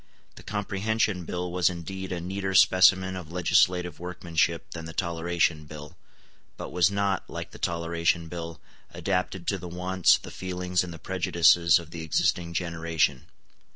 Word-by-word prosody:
The - - -13
Comprehension 105 -2 -1
Bill 90 +1 -4
was 90 0 +2
indeed 95 +2 -6
a 90 - -2
neater 95 +2 -3
specimen 95 0 +5
of 85 -3 -8
legislative 90 -1 +2
workmanship 85 -1 -1
than 80 -1 -7
the 80 - -8
Toleration 85 -2 0
Bill, 75 -1 -10 0.6
but - - -7
was 90 +1 +3
not, 100 -1 -1
like - - -6
the - - -12
Toleration 85 0 0
Bill, 85 -1 -7 0.3
adapted 90 -2 -2
to 100 - -1
the 90 - -7
wants, 90 +1 +3
the - - -11
feelings, 90 -1 -2
and 90 - -7
the 85 - -8
prejudices 85 -1 +4
of 85 -3 -8
the 85 - -6
existing 85 +2 0
generation. 80 -6 -1
90 Hz, 155 wpm, -27 LUFS, 85-95 Hz, 0.6 s, specimen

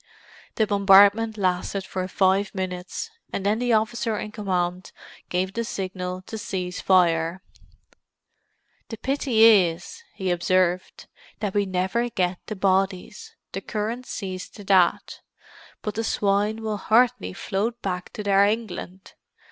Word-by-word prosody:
The 220 - +2
bombardment 205 +2 +5
lasted 185 0 -1
for 185 -1 -4
five 190 +2 +1
minutes, 185 - -4 0.2
and 195 - -4
then 210 +2 +2
the 245 -1 +1
officer 220 +1 0
in 210 - -5
command 185 -3 -2 0.4
gave 185 +1 -1
the 230 - -2
signal 185 -3 -5
to 220 +3 -7
cease 185 -5 -4
fire. 175 -1 +2 1.5
"The 225 - -6
pity 260 -2 +1
is," 180 -6 +4
he 190 -3 -2
observed, 180 +1 0 0.3
"that 205 -3 -2
we 205 -1 +1
never 190 +6 -1
get 180 -4 -1
the 215 - -4
bodies; 195 - -1 0.2
the - - -5
current 225 +4 -4
sees 185 -2 -5
to 205 - -12
that. 190 -3 +2 0.6
But 210 - -3
the 225 - -2
swine 210 +1 0
will 215 -1 -2
hardly 220 - +2
float 225 - -2
back 180 -2 -3
to 210 - -5
their 200 -1 +4
England!" 200 -3 -3
195 Hz, 135 wpm, -24 LUFS, 185-220 Hz, 1.5 s, bombardment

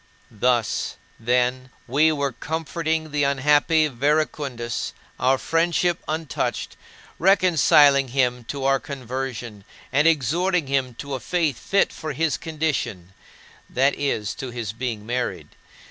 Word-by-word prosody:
Thus, 120 +1 0 0.2
then, 125 +2 0 0.2
we 150 +6 +3
were 140 -2 -1
comforting 160 +3 -3
the 145 -1 +1
unhappy 145 +3 +3
Verecundus 140 -3 -1 0.3
our 130 +1 +3
friendship 170 +3 +1
untouched 155 -2 -3 0.4
reconciling 155 -7 +5
him 125 -1 0
to 135 +2 -4
our 135 0 +3
conversion 130 -6 -6 0.3
and 150 +4 +4
exhorting 165 +4 +2
him 135 -3 -1
to 140 +3 -6
a 130 - -2
faith 160 -5 -1
fit 195 - +1
for 155 - -5
his 160 -4 0
condition 150 - -3 0.6
(that 135 +2 +2
is, 110 -8 -2
to 130 - -5
his 115 -4 -5
being 115 -3 -4
married). 120 +2 -3
140 Hz, 120 wpm, -23 LUFS, 125-155 Hz, 0.6 s, reconciling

